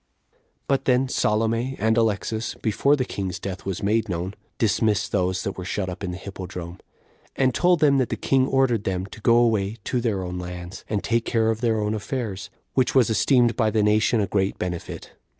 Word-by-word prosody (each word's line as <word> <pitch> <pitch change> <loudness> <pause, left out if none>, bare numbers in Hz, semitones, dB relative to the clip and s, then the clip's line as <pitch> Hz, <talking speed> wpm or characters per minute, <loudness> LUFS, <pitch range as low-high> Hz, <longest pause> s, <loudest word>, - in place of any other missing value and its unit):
2. - - -38 0.3
But 135 -1 +1
then 130 +1 +3
Salome 115 +3 0
and 110 +1 +2
Alexas, 110 0 0
before 140 +6 +3
the 130 -3 -1
king's 95 -6 -4
death 95 0 -6
was 95 -1 -3
made 110 +2 +1
known, 90 +2 -3 0.2
dismissed 110 -2 +1
those 90 -1 0
that 95 -1 -4
were - - -4
shut 95 +1 -2
up 90 - -7
in 95 - -2
the 90 - -5
hippodrome, 90 -2 -7 0.6
and 130 -2 +2
told 175 +4 +3
them 140 -3 +5
that 130 - 0
the - - -1
king 135 -1 +2
ordered 130 -6 +2
them 95 -2 -2
to 105 +2 -12
go 115 +2 +4
away 110 -3 +2
to 125 - -1
their 105 -6 -1
own 90 0 -4
lands, 90 +1 -7
and 105 -2 -1
take 115 0 0
care 115 -1 +2
of 110 +1 -4
their 115 -3 +1
own 105 0 -1
affairs, 105 -2 -4 0.2
which 130 0 +1
was 125 -4 +4
esteemed 120 +1 +3
by 110 -2 +2
the 110 -1 +1
nation 110 +2 +3
a 105 - +2
great 95 0 0
benefit. 90 -2 -5
110 Hz, 205 wpm, -24 LUFS, 95-120 Hz, 0.6 s, them